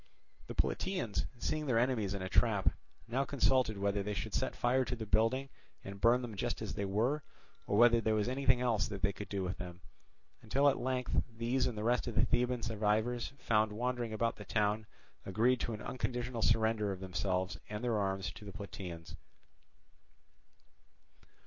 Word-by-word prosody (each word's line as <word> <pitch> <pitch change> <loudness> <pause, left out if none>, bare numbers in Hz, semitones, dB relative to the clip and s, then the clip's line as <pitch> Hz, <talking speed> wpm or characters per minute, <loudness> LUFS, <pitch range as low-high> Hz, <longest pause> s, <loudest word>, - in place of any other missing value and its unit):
The - - -6
Plataeans, 110 - -1
seeing 155 +4 -2
their 120 -3 +2
enemies 115 -5 +1
in 95 - -4
a - - -2
trap, 105 0 +3 0.4
now 130 +4 +1
consulted 130 -5 +2
whether 100 0 0
they 105 +1 -3
should - - -4
set - - -1
fire 130 +2 +2
to 125 - -3
the 115 -2 -5
building 115 +6 +2 0.3
and 100 0 -8
burn 120 +3 +5
them 120 -3 -5
just 100 - -2
as - - -4
they 100 - -2
were, 115 +10 +1 0.5
or 100 - +1
whether 120 0 +6
there 110 -1 +2
was 105 0 +1
anything 130 -1 +2
else 120 -4 +2
that 100 -2 -6
they 100 -1 +2
could 105 - -8
do 100 -2 -2
with 90 +1 -3
them; 90 0 -7 0.6
until 140 +6 +2
at 135 - 0
length 125 -1 0 0.2
these 120 +3 +1
and 115 - -4
the 105 - -3
rest 120 +2 +1
of 120 - -4
the 115 - +4
Theban 125 0 +1
survivors 110 +2 0
found 110 -3 +2
wandering 120 0 -2
about 115 +1 0
the 105 - -8
town 105 +1 0 0.4
agreed 115 +6 +2
to 120 - -2
an 105 - -6
unconditional 125 -1 -3
surrender 110 -2 +2
of 95 - -5
themselves 95 +1 -2
and 105 +2 -4
their 115 -3 +1
arms 95 -3 -1
to 100 - -12
the 100 - -7
Plataeans. 90 -5 -7
110 Hz, 185 wpm, -34 LUFS, 100-125 Hz, 0.6 s, whether